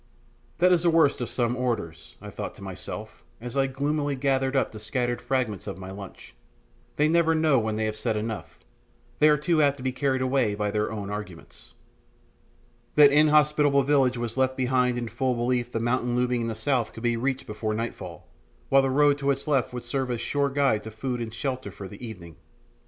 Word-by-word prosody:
That 180 +2 +4
is 175 -2 +4
the 175 - +3
worst 160 -5 +3
of 120 - -3
some 120 -1 0
orators, 120 -10 -3
I - - -9
thought - - -6
to 100 - -12
myself, 100 +3 -7 0.2
as 120 +2 -7
I 135 -1 +2
gloomily 145 +2 -1
gathered 135 0 0
up 135 - +1
the 110 - -9
scattered 120 +2 -2
fragments 125 -8 -2
of - - -5
my 95 0 -8
lunch; 95 -1 -10 0.6
they 150 - +3
never 165 0 +3
know 155 -4 +3
when 110 -1 -2
they 110 0 -1
have 110 0 -2
said 110 0 -1
enough, 110 0 -5 0.6
and 155 - +7
are 150 - +4
too 155 +2 +1
apt 140 -1 +3
to 130 - -9
be 130 - 0
carried 130 0 0
away 130 -5 +1
by 105 0 -1
their 105 +1 -1
own 100 -2 -5
arguments. 105 -5 -9 1.2
That 145 -2 +8
inhospitable 150 -1 +4
village 135 -3 +2
was 120 0 -4
left 130 0 +1
behind 125 -1 +1
in 120 -1 -3
full 125 +3 -1
belief 120 0 -1
the 115 - -2
mountain 120 +1 0
looming 125 -1 +1
in 115 - -2
the 115 - -3
south 120 0 -1
could 115 - -10
be 120 -1 +2
reached 135 +3 -2
before 110 -1 -3
nightfall, 115 +1 -6 0.4
while 135 - +6
the 135 - 0
road 145 +1 +3
to 140 -1 -1
its 140 +1 -1
left 135 -5 +1
would 125 -1 -6
serve 130 +2 -2
as 120 - 0
a - - -4
sure 140 +4 0
guide 135 -6 +2
to 110 - -8
food 120 +3 -4
and 115 -1 -4
shelter 130 -4 -3
for 100 0 -9
the 100 +5 -12
evening. 85 -8 -9
125 Hz, 210 wpm, -26 LUFS, 110-140 Hz, 1.2 s, That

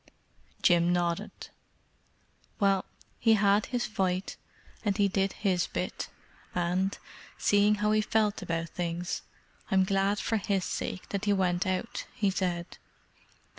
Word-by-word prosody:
Jim 175 -1 +5
nodded. 175 +3 0 1.3
"Well, 195 -2 +3 0.3
he 225 -1 +5
had 200 0 +3
his 245 -2 -1
fight, 190 -3 -1 0.5
and 205 -2 0
he 205 -1 +4
did 195 0 +1
his 185 -4 +1
bit, - - -4 0.5
and, 180 +3 0 0.4
seeing 205 +1 +4
how 210 0 +1
he 215 0 +4
felt 215 -1 +1
about 165 0 -2
things, 175 0 -3 0.5
I'm 190 -3 +4
glad 195 +1 +1
for 225 - 0
his 200 -2 0
sake 185 - -4
that 200 +1 -2
he 205 - +3
went 185 -1 +1
out," 185 +5 -2
he 205 -5 +2
said. 180 -2 -2
195 Hz, 135 wpm, -29 LUFS, 180-205 Hz, 1.3 s, Jim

